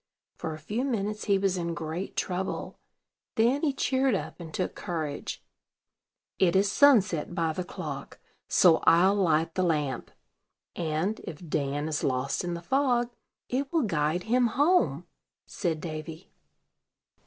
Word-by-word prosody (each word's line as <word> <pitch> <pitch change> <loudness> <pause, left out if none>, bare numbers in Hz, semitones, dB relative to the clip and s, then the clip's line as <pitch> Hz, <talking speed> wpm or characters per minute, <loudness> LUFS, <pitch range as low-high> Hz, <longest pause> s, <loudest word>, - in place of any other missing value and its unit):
For 160 - -4
a - - -9
few 210 - -3
minutes 210 -5 -2
he 200 -2 +3
was 195 -1 +1
in 170 -1 -2
great 165 +3 -5
trouble; 185 +1 -3 0.6
then 240 +6 +3
he 305 - +2
cheered 265 -2 +1
up, 185 - -5
and 165 -2 -8
took 180 +3 -2
courage. 155 -4 -4 1.0
"It 180 -2 +3
is 200 +1 +3
sunset 205 - +4
by 165 -3 0
the 185 - -3
clock; 175 - -7 0.3
so 170 -3 +6
I'll 180 +4 +6
light 165 -5 +2
the 185 - 0
lamp, 150 -8 0 0.7
and, 170 +6 -1
if 170 -1 -8
Dan 145 0 -1
is 155 -1 -2
lost 130 +4 0
in 175 -1 -2
the 170 - -7
fog, 245 +1 +1 0.4
it 270 +2 -2
will 330 -4 +2
guide 165 -3 0
him 245 +2 +3
home," 230 - +2 0.4
said 165 -5 -2
Davy. 160 +1 -7
180 Hz, 145 wpm, -28 LUFS, 160-220 Hz, 1.0 s, so